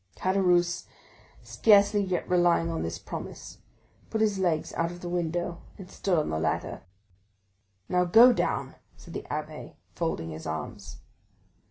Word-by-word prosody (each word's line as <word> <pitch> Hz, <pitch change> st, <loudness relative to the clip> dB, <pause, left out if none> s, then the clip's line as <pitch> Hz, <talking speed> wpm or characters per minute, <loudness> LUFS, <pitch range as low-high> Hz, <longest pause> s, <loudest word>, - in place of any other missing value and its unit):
Caderousse, 180 Hz, -2 st, +2 dB, 0.6 s
scarcely 205 Hz, -1 st, +4 dB
yet 185 Hz, -3 st, -2 dB
relying 175 Hz, -2 st, +3 dB
on 165 Hz, -, -3 dB
this 80 Hz, -, -3 dB
promise, -, -, -8 dB, 0.5 s
put 220 Hz, -, -2 dB
his 210 Hz, -3 st, +1 dB
legs 170 Hz, -4 st, 0 dB
out 165 Hz, 0 st, 0 dB
of 175 Hz, 0 st, -10 dB
the 175 Hz, -, -5 dB
window 175 Hz, 0 st, -2 dB, 0.2 s
and 190 Hz, -1 st, -11 dB
stood 185 Hz, -3 st, 0 dB
on 155 Hz, -, 0 dB
the 80 Hz, -, -1 dB
ladder. 80 Hz, 0 st, -2 dB, 1.1 s
"Now 180 Hz, 0 st, +2 dB
go 230 Hz, +8 st, +8 dB
down," -, -, -1 dB, 0.2 s
said -, -, -13 dB
the -, -, -6 dB
abbé, 155 Hz, +1 st, -6 dB, 0.2 s
folding 160 Hz, -, -3 dB
his 80 Hz, +1 st, -7 dB
arms. 80 Hz, -5 st, -6 dB
175 Hz, 145 wpm, -27 LUFS, 160-190 Hz, 1.1 s, go